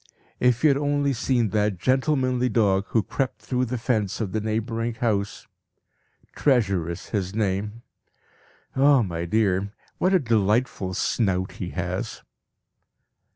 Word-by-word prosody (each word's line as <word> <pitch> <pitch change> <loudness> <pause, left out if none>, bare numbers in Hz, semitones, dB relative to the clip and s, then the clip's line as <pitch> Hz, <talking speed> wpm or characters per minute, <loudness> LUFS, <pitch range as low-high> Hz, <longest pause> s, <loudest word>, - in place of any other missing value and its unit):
If 125 +1 +2
you 155 - +6
had 135 - +1
only 145 -1 +1
seen 120 -2 +1
that 105 -1 0
gentlemanly 130 - +1
dog 100 -4 +2
who 110 - +1
crept 130 +6 -3
through 125 0 0
the 125 +1 -3
fence 110 -4 -1
of 105 -5 -2
the 110 - -1
neighbouring 115 +2 -2
house. 105 -3 -1 0.9
'Treasure' 100 - +1
is 85 - -7
his 100 -2 -2
name. 105 +2 -2 0.9
Ah, 135 -1 +5
my 85 -3 -3
dear, 100 0 +1 0.3
what 185 +1 +3
a - - +5
delightful 110 - 0
snout 95 -4 0
he 90 - -6
has!" 90 0 -4
110 Hz, 135 wpm, -24 LUFS, 100-125 Hz, 0.9 s, you